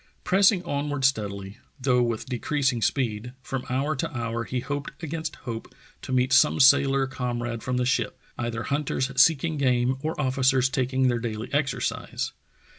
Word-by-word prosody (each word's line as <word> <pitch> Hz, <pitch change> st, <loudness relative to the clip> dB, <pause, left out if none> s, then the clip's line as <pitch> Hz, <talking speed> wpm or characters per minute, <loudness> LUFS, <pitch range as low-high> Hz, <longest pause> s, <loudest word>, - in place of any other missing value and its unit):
Pressing 195 Hz, 0 st, +4 dB
onward 145 Hz, -3 st, -1 dB
steadily, 100 Hz, -6 st, -1 dB, 0.2 s
though 125 Hz, -1 st, +2 dB
with 115 Hz, -2 st, -1 dB
decreasing 130 Hz, 0 st, 0 dB
speed, 120 Hz, -2 st, -1 dB
from 135 Hz, -2 st, -4 dB
hour 140 Hz, +4 st, 0 dB
to -, -, -2 dB
hour 115 Hz, 0 st, -2 dB
he 125 Hz, -, -2 dB
hoped 145 Hz, +3 st, -4 dB
against 160 Hz, +1 st, -4 dB
hope 115 Hz, -3 st, -6 dB, 0.3 s
to -, -, -7 dB
meet 130 Hz, +1 st, +2 dB
some 130 Hz, -, +5 dB
sailor 135 Hz, 0 st, +5 dB
comrade 120 Hz, -3 st, -3 dB
from 125 Hz, 0 st, -2 dB
the 125 Hz, -, +1 dB
ship 130 Hz, -, 0 dB
— -, -, -34 dB
either 115 Hz, -1 st, -3 dB
hunters 140 Hz, -2 st, -1 dB
seeking 160 Hz, +2 st, +3 dB
game 130 Hz, -1 st, +2 dB
or 155 Hz, +1 st, -3 dB
officers 130 Hz, -1 st, +2 dB
taking 130 Hz, 0 st, +1 dB
their 120 Hz, -1 st, +1 dB
daily 110 Hz, 0 st, -5 dB
exercise. 135 Hz, -2 st, -1 dB
130 Hz, 160 wpm, -26 LUFS, 120-140 Hz, 0.3 s, some